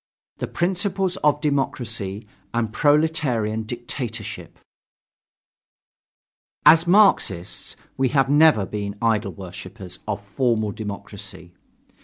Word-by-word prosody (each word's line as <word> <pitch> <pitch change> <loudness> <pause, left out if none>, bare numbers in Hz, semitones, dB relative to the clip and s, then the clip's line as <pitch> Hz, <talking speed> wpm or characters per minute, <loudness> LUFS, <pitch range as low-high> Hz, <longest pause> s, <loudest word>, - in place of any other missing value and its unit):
THE - - -3
PRINCIPLES 190 +1 0
OF 150 -3 +2
DEMOCRACY 115 -8 -2 0.3
AND 115 -2 -1
PROLETARIAN 145 -8 +1
DICTATORSHIP 120 -2 -6 2.1
As 165 +2 +7
Marxists, 175 - +2 0.2
we 130 0 +2
have 135 0 +3
never 145 -7 +5
been 100 0 -4
idol 110 -4 +1
worshippers 95 0 -9
of 100 -1 -3
formal 110 0 0
democracy. 100 -4 -7
115 Hz, 90 wpm, -23 LUFS, 100-150 Hz, 2.1 s, As